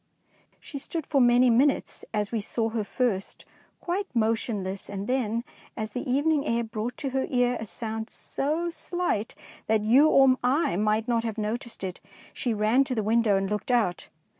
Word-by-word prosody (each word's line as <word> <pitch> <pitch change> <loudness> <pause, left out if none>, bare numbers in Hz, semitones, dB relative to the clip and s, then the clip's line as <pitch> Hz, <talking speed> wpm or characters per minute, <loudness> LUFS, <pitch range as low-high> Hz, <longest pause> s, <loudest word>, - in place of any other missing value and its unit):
She 280 - -8
stood 320 +2 -4
for 275 -3 +2
many 245 0 +5
minutes 270 +5 +2
as 210 -1 -1
we 225 -2 -1
saw 225 +2 -1
her 220 -1 -2
first, 205 -3 -2 0.3
quite 380 +3 -2
motionless, 215 -4 -1
and 200 0 -4
then, 235 -2 0 0.3
as 215 -1 -3
the 250 +3 -4
evening 290 +2 +2
air 235 -2 0
brought 225 +1 -4
to 275 -4 -3
her 265 0 -1
ear 245 -1 +2
a 220 - -5
sound 220 +1 -5
so 320 +5 -2
slight 330 - -2 0.3
that 220 -1 +2
you 255 +9 +5
or 270 -3 +5
I 255 - +2
might 215 +3 +1
not 230 -2 +1
have 225 -2 -3
noticed 220 +1 -4
it, 185 -2 -4 0.3
she 245 - -2
ran 220 +5 +3
to 255 - -2
the 220 - 0
window 220 -1 +3
and 195 0 -1
looked 210 +4 -3
out. 225 -8 +1
235 Hz, 180 wpm, -27 LUFS, 215-265 Hz, 0.3 s, many